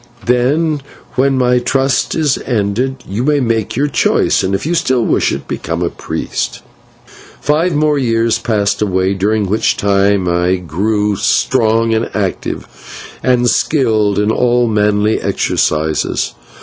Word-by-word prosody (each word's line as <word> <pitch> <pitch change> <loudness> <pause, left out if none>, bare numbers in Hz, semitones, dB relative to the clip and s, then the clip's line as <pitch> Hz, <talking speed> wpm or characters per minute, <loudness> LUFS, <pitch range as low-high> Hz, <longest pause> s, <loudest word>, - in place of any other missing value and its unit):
Then, 145 +5 +1 0.3
when 135 +1 +1
my 125 -1 +3
trust 135 0 0
is 150 -4 +1
ended, 125 +3 -1
you 105 +5 -3
may 145 +1 +2
make 115 -4 -1
your 140 +4 +1
choice, 135 - +1
and, 95 +1 0
if 95 - -4
you 165 - 0
still 130 -9 +1
wish - - +1
it, - - -5
become - - -3
a - - -1
priest." - - -4 0.8
Five 155 +3 +1
more 150 -1 +2
years 115 -2 +1
passed 105 -3 0
away, 95 -2 +1
during 105 +2 0
which 105 +3 0
time 100 -1 +2
I 90 +1 +1
grew 100 +4 -1
strong 115 +1 +2
and 110 +1 -1
active, - - -3 0.5
and 125 -1 +2
skilled 110 -8 +1
in 105 +1 +2
all 120 +1 +2
manly 105 0 +1
exercises. 80 0 -1
115 Hz, 140 wpm, -15 LUFS, 100-130 Hz, 0.8 s, my